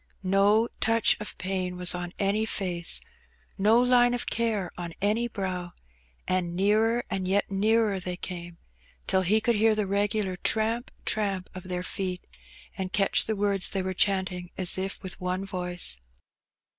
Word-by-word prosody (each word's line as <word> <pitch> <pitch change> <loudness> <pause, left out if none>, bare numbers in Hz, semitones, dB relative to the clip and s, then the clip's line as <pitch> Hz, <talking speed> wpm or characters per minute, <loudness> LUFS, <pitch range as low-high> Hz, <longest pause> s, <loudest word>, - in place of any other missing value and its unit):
No 200 +4 +3
touch 225 0 +4
of 210 - -7
pain 185 -1 -3
was 180 0 +2
on 175 -1 -4
any 200 +2 +1
face, 180 -5 -2 0.5
no 215 +4 +4
line 245 -1 +4
of 245 - -1
care 220 -6 -1
on 170 -2 -6
any 215 +4 +1
brow, 185 -5 -4 0.5
and 180 -2 0
nearer 220 +5 +2
and 190 -1 -1
yet 200 +1 +1
nearer 210 0 +2
they 180 0 -4
came, 175 -2 -7 0.5
till 190 0 +2
he 200 +4 +3
could 235 +2 +1
hear 220 +1 +4
the 210 -1 0
regular 200 0 0
tramp, 225 +5 0 0.2
tramp 195 -4 -1
of 185 0 -9
their 180 0 -2
feet, 185 -1 -3 0.5
and 190 -1 -4
catch 195 +1 +3
the 220 - -1
words 200 -1 +2
they 190 -1 -2
were 185 0 -2
chanting 185 -2 0
as 185 -1 +3
if 190 +1 -4
with 185 0 -6
one 180 +1 -2
voice. 180 - 0
195 Hz, 160 wpm, -27 LUFS, 180-215 Hz, 0.5 s, touch